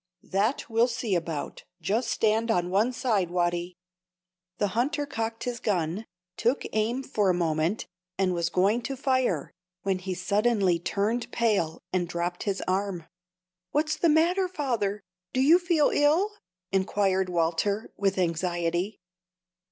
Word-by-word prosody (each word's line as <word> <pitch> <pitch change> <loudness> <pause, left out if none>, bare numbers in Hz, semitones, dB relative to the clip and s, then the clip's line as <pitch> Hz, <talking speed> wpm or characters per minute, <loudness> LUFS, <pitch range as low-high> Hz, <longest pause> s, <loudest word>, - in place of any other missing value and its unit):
"That 205 +7 0
we'll 230 +1 +3
see 230 -3 -2
about. 165 -4 -3 0.2
Just 210 +8 0
stand 220 +1 +1
on 180 -4 +1
one 210 +6 +3
side, 220 -8 0
Watty." 175 0 -1 0.8
The 205 - +1
hunter 285 +8 0
cocked 225 -4 -3
his 245 -2 -3
gun, 185 0 -1 0.3
took 240 +5 +1
aim 225 +5 0
for 210 -6 +1
a 180 - +3
moment, 165 +3 0 0.3
and 185 -1 +2
was 170 -1 0
going 200 +7 +2
to 270 +3 -4
fire, 255 - 0 0.3
when 195 -1 0
he 185 0 -4
turned - - -10
suddenly 200 -4 +2
pale, 215 -3 0
and 180 -2 +1
dropped 175 +1 -3
his 195 - -2
arm. 185 -2 -1 0.7
"What's 305 +1 +1
the 340 - +2
matter, 345 +5 +3
father? 235 - -2 0.3
Do 255 - 0
you 310 +7 +6
feel 340 -4 +2
ill?" 320 +8 +3 0.4
inquired 190 -1 +1
Walter, 175 +5 0
with 195 -1 0
anxiety. 175 +2 -1
205 Hz, 140 wpm, -27 LUFS, 180-240 Hz, 0.8 s, you